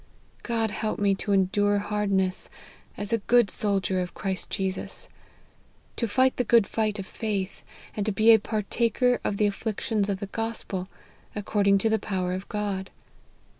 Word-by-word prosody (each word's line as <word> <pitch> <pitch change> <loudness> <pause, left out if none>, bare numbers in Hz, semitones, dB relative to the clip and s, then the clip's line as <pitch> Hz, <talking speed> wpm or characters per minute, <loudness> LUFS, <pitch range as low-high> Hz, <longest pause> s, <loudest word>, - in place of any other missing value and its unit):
God 225 -2 0
help 215 0 -2
me 200 -1 +3
to 205 +2 -3
endure 205 +1 +3
hardness, 200 -2 0 0.5
as 205 +2 -3
a 230 - +3
good 235 +1 +3
soldier 195 -2 0
of 180 -1 -4
Christ 190 -2 -3
Jesus; 190 -1 -3 0.9
to 230 - -1
fight 260 +5 +2
the 250 - +2
good 230 -2 +5
fight 215 0 -1
of 195 - -5
faith; 200 -3 -3 0.3
and 210 - -1
to - - +2
be 220 +3 +6
a 220 - +6
partaker 230 +4 +1
of 200 - -1
the 210 - +3
afflictions 205 0 -1
of 195 -1 -1
the 200 - -3
Gospel, 205 -3 -3 0.5
according 200 -1 +2
to - - +5
the 220 - +2
power 185 -3 -2
of 190 +1 -5
God. 200 -3 -2
205 Hz, 165 wpm, -26 LUFS, 195-220 Hz, 0.9 s, be